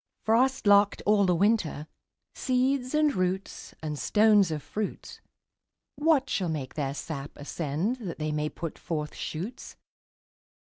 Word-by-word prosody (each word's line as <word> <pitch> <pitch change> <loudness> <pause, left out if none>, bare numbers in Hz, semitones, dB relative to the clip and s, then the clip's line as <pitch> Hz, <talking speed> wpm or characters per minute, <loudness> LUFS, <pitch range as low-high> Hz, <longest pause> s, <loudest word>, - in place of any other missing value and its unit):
Frost 255 +4 +2
locked 205 0 +5
all 205 -2 +4
the 180 - +3
winter, 190 -6 +1 0.5
Seeds, 255 +1 0
and 305 -1 +3
roots, 185 +1 -3
and 150 -2 -3
stones 210 +2 +4
of 155 -3 -4
fruits, 210 -1 -5 0.7
What 295 -3 +3
shall 185 -8 -1
make 145 -5 -4
their 140 -2 -2
sap 145 -2 -5
ascend 160 - -2
That 195 -9 -6
they 155 0 -2
may 150 0 -1
put 165 0 -6
forth 150 -3 -4
shoots? 190 +11 -6
190 Hz, 135 wpm, -28 LUFS, 155-230 Hz, 0.7 s, locked